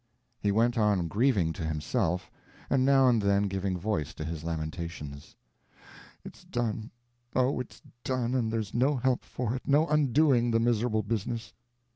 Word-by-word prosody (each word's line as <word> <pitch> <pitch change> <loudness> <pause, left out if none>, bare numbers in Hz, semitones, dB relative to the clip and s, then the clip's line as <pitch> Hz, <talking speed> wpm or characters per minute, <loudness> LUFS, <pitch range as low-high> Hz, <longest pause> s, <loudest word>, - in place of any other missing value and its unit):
He 100 - +1
went 115 +3 +2
on 100 -5 +2
grieving 100 -5 +2
to 80 - -6
himself, 80 +2 -1 0.4
and 135 -2 +3
now 135 -1 +5
and 120 -3 +4
then 100 0 +2
giving 95 -1 -1
voice 85 -6 -2
to 75 - -5
his 80 -1 -5
lamentations. 80 -3 -5 0.9
"It's - - -11
done, 115 -2 -3 0.5
oh, 130 +1 +2
it's 125 - -8 0.2
done, 125 -2 -1
and 120 -4 0
there's 110 -3 -3
no 130 +5 +2
help 130 0 0
for 120 -2 -3
it, 130 - -6
no 145 +3 +4
undoing 145 -4 +3
the 115 0 +2
miserable 115 -1 +1
business. 115 +2 -3
110 Hz, 155 wpm, -29 LUFS, 90-125 Hz, 0.9 s, now